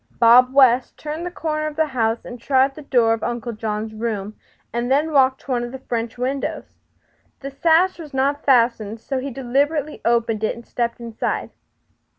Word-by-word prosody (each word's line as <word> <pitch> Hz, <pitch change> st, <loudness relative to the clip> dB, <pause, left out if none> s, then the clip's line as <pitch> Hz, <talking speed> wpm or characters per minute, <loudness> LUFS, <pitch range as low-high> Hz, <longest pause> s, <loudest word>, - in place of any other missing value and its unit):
Bob 245 Hz, +2 st, +6 dB
West 260 Hz, -2 st, +4 dB
turned 310 Hz, +3 st, -5 dB
the -, -, -3 dB
corner 310 Hz, -3 st, -3 dB
of 305 Hz, -, -6 dB
the 315 Hz, +1 st, +2 dB
house, 230 Hz, -5 st, -1 dB
tried 265 Hz, +2 st, +2 dB
the 305 Hz, -, -10 dB
door 240 Hz, -5 st, +2 dB
of 225 Hz, -, -3 dB
Uncle 240 Hz, -1 st, -3 dB
John's 215 Hz, 0 st, -4 dB
room, 215 Hz, -2 st, -4 dB, 0.4 s
and 240 Hz, +1 st, -2 dB
then 295 Hz, +4 st, +2 dB
walked 265 Hz, -2 st, +3 dB
to 275 Hz, -, -8 dB
one 240 Hz, -1 st, 0 dB
of 240 Hz, -, -6 dB
the 265 Hz, -, -6 dB
French 235 Hz, -2 st, -4 dB
windows. 265 Hz, +3 st, -4 dB, 0.6 s
The 275 Hz, 0 st, -6 dB
sash 335 Hz, +6 st, +2 dB
was 310 Hz, -3 st, -9 dB
not 275 Hz, +2 st, 0 dB
fastened, 230 Hz, -4 st, +2 dB
so 265 Hz, +3 st, -3 dB
he 270 Hz, +2 st, -4 dB
deliberately 275 Hz, +4 st, -1 dB
opened 230 Hz, -2 st, +1 dB
it 220 Hz, -, 0 dB
and 235 Hz, 0 st, -12 dB
stepped 235 Hz, -1 st, -2 dB
inside. 230 Hz, -2 st, -3 dB
255 Hz, 180 wpm, -21 LUFS, 230-280 Hz, 0.6 s, Bob